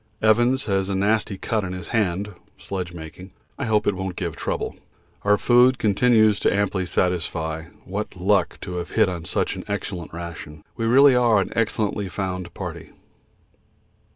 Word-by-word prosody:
Evans 120 +4 +3
has 95 -2 0
a 100 - -1
nasty 105 +1 +1
cut 110 +2 -1
on 90 -1 -4
his 90 -2 -7
hand 100 -2 0 0.2
(sledge 90 -3 -5
making). 85 +3 -10 0.3
I - - -1
hope 105 -1 +2
it 105 - +2
won't 95 -1 -4
give 85 -4 -3
trouble. - - -3 0.5
Our 105 0 +3
food 125 +3 +5
continues 110 -1 +3
to - - +2
amply 100 -2 0
satisfy. 80 -3 -1 0.2
What 100 +3 -4
luck 95 0 +1
to 90 -1 -5
have 85 0 -4
hit - - +3
on 85 -3 -4
such - - -1
an - - -6
excellent 95 -5 -4
ration. 85 -2 -8
We 115 - -2
really 135 +3 +6
are 120 -4 +4
an 95 - -2
excellently 105 -3 0
found 90 -2 -4
party. - - -7
100 Hz, 165 wpm, -23 LUFS, 90-110 Hz, 0.5 s, really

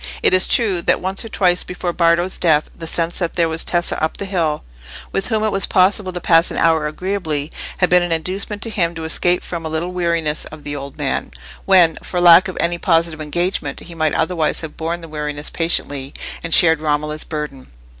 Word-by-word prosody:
It - - +4
is 185 0 +5
true 200 -7 +2
that - - +1
once 190 +1 -2
or 225 - -8
twice 180 -3 +2
before 180 -1 -4
Bardo's 170 +2 +2
death, 155 -3 +2
the 165 - -7
sense 165 +1 -1
that 170 -3 -2
there 170 -2 +2
was 160 0 +1
Tessa 175 -2 -1
up 160 - 0
the 200 - -4
hill, 170 -6 -1 0.5
with 195 - -1
whom 220 -2 0
it 215 - +1
was 195 - 0
possible 190 0 +2
to 180 - -5
pass 165 0 +3
an - - -4
hour 160 -2 +2
agreeably, 160 -3 -3 0.3
had 180 - +1
been 180 0 +6
an 175 -1 -2
inducement 190 +5 -2
to 225 - -1
him 170 -4 -1
to 160 - -6
escape 175 +2 +1
from 170 -2 -6
a 160 - -4
little 160 +3 -3
weariness 170 -4 -1
of 155 -1 -11
the 145 0 -5
old 140 -1 -8
man, - - -2 0.4
when, 175 -4 +5
for 180 - -3
lack 175 +3 +7
of 185 - -7
any 170 0 0
positive 165 -3 +1
engagement, 155 -2 -2
he 170 - -11
might 155 -2 0
otherwise 160 -2 0
have 160 -2 -8
borne 170 +2 -3
the 165 - -9
weariness 150 -1 -5
patiently 145 -5 -1 0.3
and 165 - -6
shared 160 -2 +6
Romola's 150 0 -1
burden. 150 -4 -6
170 Hz, 215 wpm, -19 LUFS, 155-180 Hz, 0.5 s, lack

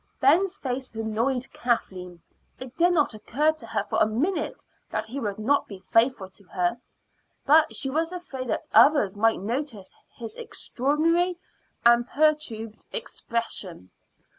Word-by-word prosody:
Ben's 355 +8 +3
face 255 - -4
annoyed 230 +4 -1
Kathleen. 185 -7 -2 0.4
It 260 -1 -9
did 350 +1 +4
not 300 -8 +2
occur 275 +8 +1
to 310 -7 -11
her 215 -3 -1
for 205 - -1
a - - +5
minute 285 - -2 0.2
that - - -2
he 250 +5 -6
would 205 -5 -3
not 265 +7 +1
be 195 -2 -10
faithful 225 -4 +3
to 195 +2 -17
her, 180 +6 -1 0.6
but 310 +2 +5
she 270 -1 -2
was 325 +4 0
afraid 280 -8 -6
that 280 - -2
others 280 -10 +5
might 225 -1 +2
notice 230 -2 -4 0.2
his 225 -3 -7
extraordinary 330 +11 0 0.5
and 235 0 +6
perturbed 275 -8 0
expression. 230 - -5
245 Hz, 140 wpm, -26 LUFS, 215-300 Hz, 0.6 s, and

